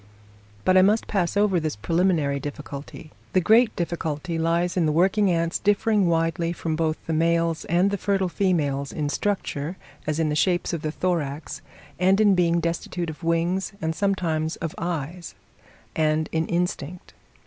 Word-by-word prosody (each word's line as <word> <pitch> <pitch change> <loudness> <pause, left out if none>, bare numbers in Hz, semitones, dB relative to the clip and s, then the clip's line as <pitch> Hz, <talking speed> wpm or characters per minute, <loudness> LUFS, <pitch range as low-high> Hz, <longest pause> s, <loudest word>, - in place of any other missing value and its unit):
But 185 0 +5
I - - +8
must 210 +4 +3
pass 190 -2 -1
over 200 -3 +3
this 155 -5 -2
preliminary 160 - +1
difficulty. 145 +2 -8 0.2
The 185 - +5
great 220 +5 +4
difficulty 165 -1 -3
lies 170 +2 +1
in 170 -4 +2
the - - +2
working 190 +5 +3
ants 170 -1 0
differing 205 -1 +2
widely 165 0 0
from 165 -2 -3
both 160 -1 0
the 165 - -2
males 165 0 +1
and 180 +4 +2
the 200 - -2
fertile 195 -1 +1
females 150 -8 0
in 150 -2 -2
structure, 180 -3 -2 0.3
as 155 +1 -1
in 160 -1 +1
the 150 - -1
shape 175 +2 +1
of 165 - -2
the 155 - -2
thorax, 160 -4 -2 0.4
and 190 +2 +4
in 210 -2 +5
being 170 -2 +2
destitute 170 0 -3
of 155 - -13
wings 170 +4 0
and 160 0 -1
sometimes 165 -5 -1
of 165 -1 -5
eyes, 170 - -4 0.6
and 155 0 +1
in 160 0 0
instinct. 175 -1 -3
170 Hz, 165 wpm, -24 LUFS, 155-185 Hz, 0.6 s, I